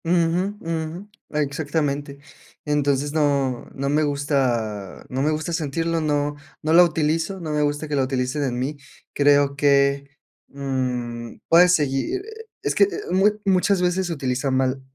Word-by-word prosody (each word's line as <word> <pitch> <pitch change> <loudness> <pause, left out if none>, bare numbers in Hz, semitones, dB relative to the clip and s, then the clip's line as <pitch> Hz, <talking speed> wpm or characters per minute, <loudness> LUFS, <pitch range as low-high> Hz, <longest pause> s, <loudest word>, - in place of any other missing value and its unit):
Ujú, 175 +4 +1
ujú. 165 +4 -4 0.2
Exactamente. 145 -1 -2 0.5
Entonces, 145 -1 0
no 140 -5 0
no 140 0 -2
me 150 +2 +2
gusta 125 - -1
no 130 +1 -2
me 150 - +2
gusta 155 +2 -2
sentirlo, 165 +1 -1
no 145 -1 0 0.3
no 155 +1 +1
la 175 +2 +9
utilizo, 165 +3 0
no 160 -3 -5
me 150 0 +1
gusta 145 +1 -1
que 150 - -2
la 135 - +2
utilicen 130 +2 -1
en 125 -3 -2
mí. 135 +4 -3 0.4
Creo 145 -1 +3
que, 140 -1 +2 0.4
mm, 125 -4 -3
puedes 180 +2 +6
seguir 150 - -1 0.4
es - - 0
que, - - +5
eh, - - -3 0.2
mu 195 +3 +5 0.2
muchas 190 0 +2
veces 180 +1 +1
se 170 - -2
utiliza 135 -1 -2
mal, 130 0 0
145 Hz, 155 wpm, -23 LUFS, 135-165 Hz, 0.5 s, la